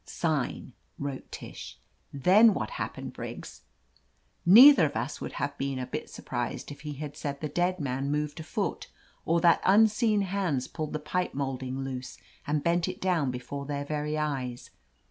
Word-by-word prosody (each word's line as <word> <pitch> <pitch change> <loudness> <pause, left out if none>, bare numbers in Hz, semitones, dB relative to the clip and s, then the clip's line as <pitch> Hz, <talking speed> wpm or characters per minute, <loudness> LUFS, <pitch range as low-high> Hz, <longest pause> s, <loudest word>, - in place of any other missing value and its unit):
"Sign," - - -2 0.2
wrote 140 -2 -5
Tish. - - -9 0.3
"Then 195 - +5
Vhat 110 - -3
happened, - - -5
Briggs?" - - -8 0.9
Neither 225 - +9
of 145 - -8
us 115 +4 -3
would - - -5
have 145 0 -3
been 135 -1 -2
a 130 - -3
bit - - -5
surprised - - -4
if 145 - -10
he 150 -1 -5
had 145 0 -7
said 140 -2 -4
the 155 - -3
dead 175 +5 0
man 135 -1 -2
moved 150 +2 -2
a - - -5
foot, - - -3 0.4
or 170 +1 +2
that 170 -1 +5
tmseen 215 +1 +4
hands 180 -9 -1
pulled 155 -2 -5
the - - 0
pipe 175 +3 -2
molding 135 -1 -3
loose 130 -1 -6 0.3
and 150 0 0
bent 170 +1 +2
it 185 - -5
down 175 -7 +1
before 130 +3 -5
their 145 -1 -3
very 150 +1 -2
eyes. 135 -5 -3
150 Hz, 170 wpm, -28 LUFS, 135-175 Hz, 0.9 s, Neither